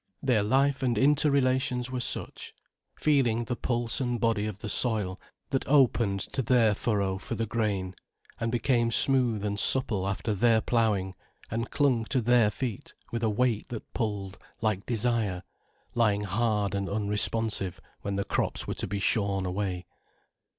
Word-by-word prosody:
Their 125 Hz, -6 st, +3 dB
life 135 Hz, +6 st, +2 dB
and 120 Hz, -4 st, 0 dB
interrelations 130 Hz, -2 st, +2 dB
were 130 Hz, -, -2 dB
such; 120 Hz, -, -3 dB, 0.4 s
feeling 125 Hz, -6 st, +2 dB
the 120 Hz, +1 st, -3 dB
pulse 120 Hz, +1 st, -2 dB
and 120 Hz, -2 st, -1 dB
body 115 Hz, -3 st, +1 dB
of 105 Hz, -3 st, -5 dB
the 110 Hz, -, -7 dB
soil, 105 Hz, -5 st, 0 dB, 0.3 s
that 135 Hz, -, -1 dB
opened 120 Hz, -8 st, +3 dB
to 135 Hz, -, 0 dB
their 120 Hz, -4 st, +3 dB
furrow 100 Hz, -3 st, -1 dB
for -, -, -5 dB
the 115 Hz, -, -1 dB
grain, 105 Hz, -4 st, -2 dB, 0.5 s
and 115 Hz, 0 st, -1 dB
became 120 Hz, 0 st, +1 dB
smooth 120 Hz, -4 st, +3 dB
and 105 Hz, 0 st, -2 dB
supple 105 Hz, -8 st, +2 dB
after 105 Hz, +3 st, -2 dB
their 115 Hz, +2 st, +3 dB
ploughing, 110 Hz, -5 st, 0 dB, 0.4 s
and 115 Hz, +2 st, -2 dB
clung 130 Hz, -6 st, +1 dB
to 130 Hz, +2 st, 0 dB
their 120 Hz, -2 st, +4 dB
feet 105 Hz, +1 st, -5 dB, 0.2 s
with 115 Hz, -, -3 dB
a 115 Hz, -, +1 dB
weight 115 Hz, 0 st, 0 dB
that 115 Hz, -3 st, -8 dB
pulled 105 Hz, -4 st, -3 dB, 0.2 s
like 110 Hz, -3 st, -1 dB
desire, 110 Hz, -5 st, 0 dB, 0.5 s
lying 105 Hz, -3 st, +2 dB
hard 105 Hz, 0 st, 0 dB
and 100 Hz, -1 st, -2 dB
unresponsive 105 Hz, -1 st, 0 dB, 0.2 s
when 100 Hz, 0 st, -3 dB
the 100 Hz, 0 st, -2 dB
crops -, -, -1 dB
were -, -, -3 dB
to -, -, -3 dB
be 100 Hz, +2 st, -3 dB
shorn 100 Hz, -1 st, +1 dB
away. 90 Hz, -1 st, -3 dB
115 Hz, 155 wpm, -28 LUFS, 100-125 Hz, 0.5 s, their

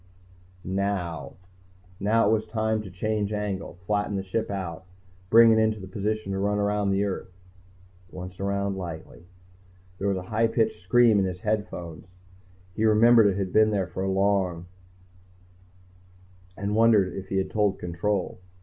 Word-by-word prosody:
Now 95 Hz, -3 st, -3 dB, 0.7 s
it 105 Hz, +1 st, +3 dB
was 110 Hz, 0 st, 0 dB
time 110 Hz, 0 st, -1 dB
to 100 Hz, -, -9 dB
change 105 Hz, +3 st, -2 dB
angle, 105 Hz, -4 st, -4 dB
flatten 105 Hz, 0 st, -1 dB
the 95 Hz, -, -2 dB
ship 105 Hz, +4 st, -3 dB
out, 95 Hz, -3 st, -5 dB, 0.5 s
bring 115 Hz, 0 st, +7 dB
it 110 Hz, -, +4 dB
into 110 Hz, -1 st, +1 dB
position 105 Hz, +2 st, -3 dB
to 95 Hz, -, -2 dB
run 105 Hz, +1 st, 0 dB
around 105 Hz, 0 st, 0 dB
the 100 Hz, +1 st, +1 dB
earth. 95 Hz, -2 st, -4 dB, 0.8 s
Once 90 Hz, 0 st, -9 dB
around 100 Hz, 0 st, -1 dB
lightly. 85 Hz, 0 st, -8 dB, 0.7 s
There 100 Hz, -, -1 dB
was 100 Hz, -1 st, +1 dB
a 90 Hz, -, -5 dB
high 115 Hz, +2 st, +3 dB
pitched 115 Hz, -4 st, 0 dB
scream 110 Hz, +3 st, +4 dB
in 95 Hz, -, +2 dB
his 90 Hz, +1 st, -6 dB
earphones. 90 Hz, -6 st, -3 dB, 0.7 s
He 110 Hz, -, -2 dB
remembered 110 Hz, +1 st, +6 dB
it 100 Hz, -1 st, 0 dB
had 95 Hz, -2 st, -3 dB
been 110 Hz, 0 st, +5 dB
there 100 Hz, -3 st, 0 dB
for 95 Hz, +2 st, -4 dB
long, 95 Hz, -3 st, 0 dB, 1.9 s
and 100 Hz, +1 st, -2 dB
wondered 110 Hz, -5 st, +4 dB
if 95 Hz, 0 st, -7 dB
he 95 Hz, -, -1 dB
had 95 Hz, -, -1 dB
told 105 Hz, -2 st, +1 dB
Control. 90 Hz, +3 st, -2 dB
100 Hz, 150 wpm, -26 LUFS, 95-110 Hz, 1.9 s, bring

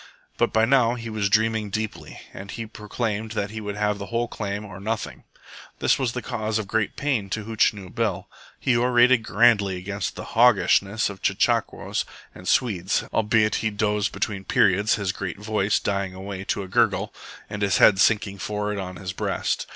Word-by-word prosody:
But -, -, +2 dB
by 110 Hz, 0 st, +3 dB
now 125 Hz, -2 st, +3 dB
he 115 Hz, -2 st, -6 dB
was 105 Hz, -2 st, 0 dB
dreaming 110 Hz, 0 st, +2 dB
deeply, 110 Hz, +1 st, -5 dB
and 100 Hz, +1 st, -9 dB
he 115 Hz, +2 st, -5 dB
proclaimed 110 Hz, 0 st, -4 dB
he 110 Hz, 0 st, -3 dB
would 105 Hz, -1 st, -4 dB
have 105 Hz, -1 st, 0 dB
the 100 Hz, -, -6 dB
whole 115 Hz, +1 st, -1 dB
claim 105 Hz, -2 st, -4 dB
or 100 Hz, -2 st, -9 dB
nothing. 110 Hz, +2 st, -4 dB, 0.5 s
This -, -, +2 dB
was 125 Hz, -3 st, 0 dB
the 125 Hz, -, -4 dB
cause 110 Hz, 0 st, -2 dB
of 110 Hz, -, -2 dB
great 110 Hz, +1 st, -1 dB
pain 130 Hz, -9 st, -1 dB
to 110 Hz, +2 st, -3 dB
Hootchinoo 105 Hz, -3 st, 0 dB
Bill. 105 Hz, -6 st, -1 dB, 0.3 s
He 130 Hz, -3 st, +2 dB
orated 120 Hz, 0 st, +4 dB
grandly 105 Hz, -3 st, +3 dB
against 100 Hz, +3 st, -4 dB
the -, -, -6 dB
"hawgishness" 110 Hz, -3 st, +3 dB
of 95 Hz, -, -12 dB
chechaquos -, -, 0 dB, 0.3 s
and 90 Hz, -, -11 dB
Swedes, 100 Hz, -7 st, +1 dB
albeit 110 Hz, 0 st, +2 dB
he 110 Hz, -, +1 dB
dozed 105 Hz, 0 st, 0 dB
between 100 Hz, -3 st, -3 dB
periods, 100 Hz, +2 st, +3 dB
his 100 Hz, -3 st, -1 dB
voice 100 Hz, +2 st, -1 dB
dying 100 Hz, -2 st, -2 dB
away 95 Hz, 0 st, -6 dB
to 100 Hz, -, -1 dB
a -, -, -8 dB
gurgle, 95 Hz, -, +1 dB, 0.3 s
and 105 Hz, -, -6 dB
his 100 Hz, -2 st, +2 dB
head 95 Hz, -2 st, +6 dB
sinking 105 Hz, -2 st, +2 dB
forward 105 Hz, 0 st, -2 dB
on 90 Hz, -1 st, -5 dB
his 90 Hz, -1 st, -6 dB
breast. -, -, -2 dB
105 Hz, 175 wpm, -24 LUFS, 100-110 Hz, 0.5 s, head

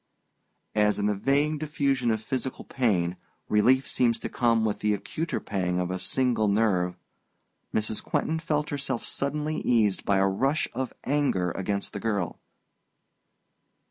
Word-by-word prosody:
As, 105 Hz, -1 st, +3 dB
in 105 Hz, -, 0 dB
the 105 Hz, -, +2 dB
vague 140 Hz, +8 st, +1 dB
diffusion 140 Hz, -5 st, 0 dB
of 110 Hz, -1 st, 0 dB
physical 130 Hz, +3 st, -3 dB
pain, 95 Hz, -9 st, 0 dB, 0.3 s
relief 130 Hz, +6 st, +4 dB
seems 120 Hz, -2 st, +2 dB
to -, -, -3 dB
come 115 Hz, -2 st, +2 dB
with 105 Hz, -, -1 dB
the 105 Hz, 0 st, +2 dB
acuter 160 Hz, +10 st, -3 dB
pang 90 Hz, -3 st, -1 dB
of 90 Hz, 0 st, -1 dB
a 95 Hz, -, -2 dB
single 125 Hz, -1 st, +1 dB
nerve, 100 Hz, -4 st, +2 dB, 0.7 s
Mrs. 110 Hz, 0 st, -1 dB
Quentin 160 Hz, +1 st, -1 dB
felt 150 Hz, -2 st, -1 dB
herself 135 Hz, -4 st, -2 dB
suddenly 150 Hz, +2 st, -2 dB
eased 110 Hz, -5 st, +2 dB
by 100 Hz, -, +2 dB
a 95 Hz, -, +4 dB
rush 135 Hz, +10 st, +1 dB
of 130 Hz, +1 st, -3 dB
anger 135 Hz, -11 st, +1 dB
against 100 Hz, +2 st, -2 dB
the 100 Hz, -, -4 dB
girl. 100 Hz, -5 st, -2 dB
115 Hz, 145 wpm, -27 LUFS, 100-135 Hz, 0.7 s, relief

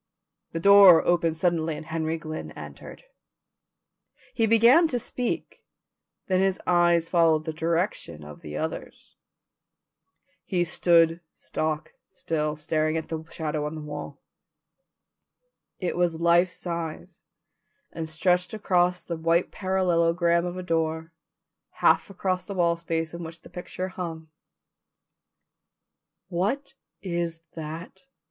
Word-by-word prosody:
The 165 Hz, -, -3 dB
door 200 Hz, -2 st, +8 dB
opened 165 Hz, -2 st, +2 dB
suddenly 165 Hz, -2 st, 0 dB
and -, -, -9 dB
Henry 160 Hz, 0 st, -2 dB
Glynn 155 Hz, 0 st, -6 dB
entered. -, -, -10 dB, 1.3 s
He 225 Hz, -2 st, +2 dB
began 235 Hz, +9 st, +6 dB
to 250 Hz, -, -1 dB
speak, 245 Hz, +1 st, -3 dB, 0.6 s
then 185 Hz, -1 st, +1 dB
his 190 Hz, -1 st, +1 dB
eyes 175 Hz, -1 st, +3 dB
followed 165 Hz, -3 st, +3 dB
the 160 Hz, -, -3 dB
direction 165 Hz, -, -2 dB
of 75 Hz, 0 st, -11 dB
the 75 Hz, 0 st, -7 dB
others'. -, -, -6 dB, 1.3 s
He 180 Hz, -2 st, 0 dB
stood 170 Hz, 0 st, +3 dB
stock 155 Hz, 0 st, -3 dB, 0.2 s
still 150 Hz, -1 st, -2 dB
staring 155 Hz, +1 st, 0 dB
at 160 Hz, -, -5 dB
the 160 Hz, -1 st, -4 dB
shadow 150 Hz, -2 st, -3 dB
on 150 Hz, -, -6 dB
the 155 Hz, -, -6 dB
wall. 150 Hz, -1 st, -7 dB, 1.6 s
It 180 Hz, -, -2 dB
was 175 Hz, -2 st, 0 dB
life 170 Hz, +2 st, +4 dB
size 170 Hz, 0 st, -6 dB, 0.7 s
and 160 Hz, -1 st, -5 dB
stretched 180 Hz, +4 st, +1 dB
across 180 Hz, -3 st, +1 dB
the 170 Hz, -, -4 dB
white 165 Hz, +2 st, +1 dB
parallelogram 170 Hz, -2 st, +1 dB
of 175 Hz, +1 st, -5 dB
a 185 Hz, -, -5 dB
door, 160 Hz, -1 st, -1 dB, 0.6 s
half -, -, +3 dB
across 185 Hz, -2 st, -2 dB
the 200 Hz, +2 st, -7 dB
wall 170 Hz, -2 st, +2 dB
space 165 Hz, -1 st, -3 dB
on 170 Hz, -, -6 dB
which 165 Hz, +1 st, -9 dB
the -, -, -14 dB
picture 185 Hz, +1 st, -5 dB
hung. 165 Hz, -4 st, -6 dB, 2.0 s
"What 205 Hz, +12 st, -1 dB, 0.3 s
is 170 Hz, -3 st, -3 dB
that?" 165 Hz, +4 st, -8 dB
170 Hz, 125 wpm, -26 LUFS, 160-180 Hz, 2.0 s, door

